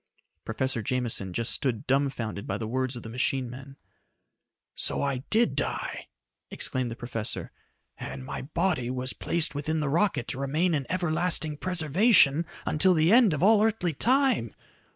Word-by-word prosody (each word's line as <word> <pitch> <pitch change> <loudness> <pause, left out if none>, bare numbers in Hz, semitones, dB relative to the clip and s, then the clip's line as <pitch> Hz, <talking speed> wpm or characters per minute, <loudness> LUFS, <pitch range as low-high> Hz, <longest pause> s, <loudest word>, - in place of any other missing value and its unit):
Professor 130 +2 -2
Jameson 115 -4 -2
just 115 +4 -1
stood 125 -6 -2
dumfounded 130 -6 -1
by 95 - -2
the 110 - -5
words 130 +2 -1
of 120 - -8
the - - -8
machine 125 +1 -1
man. 135 +2 -11 1.0
"So - - +2
I 140 -2 0
did 230 +2 +2
die!" - - -3 0.4
exclaimed 130 -2 -3
the 115 - -6
professor. 120 -2 -5 0.5
"And 65 0 -7
my - - -5
body 155 -3 -1
was 130 0 -2
placed 170 -1 0
within 155 +2 -2
the 150 -2 -1
rocket 170 - +1
to 130 - -4
remain 155 +6 0
in 140 -4 -2
everlasting 170 -3 0
preservation 170 - +4 0.2
until 180 +4 +3
the 160 +3 +3
end 235 -5 +6
of 150 +1 -1
all 210 +1 +5
earthly 210 -7 0
time! 250 - +2
140 Hz, 155 wpm, -27 LUFS, 125-175 Hz, 1.0 s, end